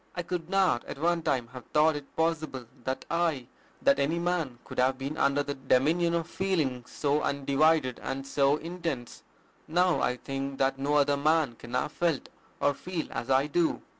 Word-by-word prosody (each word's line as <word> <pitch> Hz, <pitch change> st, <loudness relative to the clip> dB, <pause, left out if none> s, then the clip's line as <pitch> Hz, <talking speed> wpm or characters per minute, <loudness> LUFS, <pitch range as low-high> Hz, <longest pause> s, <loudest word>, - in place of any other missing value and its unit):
I 175 Hz, -, -2 dB
could 170 Hz, -1 st, -4 dB
not 190 Hz, -10 st, +2 dB
at -, -, -7 dB
one 170 Hz, +3 st, +1 dB
time 130 Hz, -7 st, 0 dB
have 125 Hz, -1 st, -10 dB
thought 155 Hz, +1 st, +5 dB
it 145 Hz, -1 st, -8 dB
possible 160 Hz, -6 st, -1 dB, 0.2 s
that 130 Hz, 0 st, -3 dB
I, 165 Hz, -6 st, +1 dB, 0.4 s
that 275 Hz, +1 st, +4 dB
any 155 Hz, +5 st, +1 dB
man, 170 Hz, -7 st, -1 dB
could -, -, -6 dB
have 130 Hz, +1 st, +3 dB
been 135 Hz, +3 st, -4 dB
under 145 Hz, -1 st, +2 dB
the 145 Hz, -, -3 dB
dominion 150 Hz, +6 st, +2 dB
of 165 Hz, -1 st, -1 dB
feelings 155 Hz, -12 st, -1 dB
so 145 Hz, +1 st, 0 dB
undivided 140 Hz, -1 st, +2 dB
and 135 Hz, 0 st, -4 dB
so 140 Hz, +1 st, +3 dB
intense: 165 Hz, -7 st, -5 dB, 0.5 s
now 180 Hz, +3 st, +2 dB
I 125 Hz, -, +1 dB
think 135 Hz, +1 st, -4 dB
that 135 Hz, 0 st, +1 dB
no 145 Hz, +2 st, +1 dB
other 145 Hz, -1 st, +3 dB
man 155 Hz, -2 st, +2 dB
can 120 Hz, +2 st, -8 dB
have 135 Hz, +4 st, 0 dB
felt 165 Hz, -5 st, -1 dB, 0.3 s
or 145 Hz, 0 st, +3 dB
feel 175 Hz, +2 st, -5 dB
as 115 Hz, +1 st, -4 dB
I 135 Hz, +1 st, +4 dB
do." 160 Hz, +2 st, 0 dB
145 Hz, 185 wpm, -29 LUFS, 135-165 Hz, 0.5 s, thought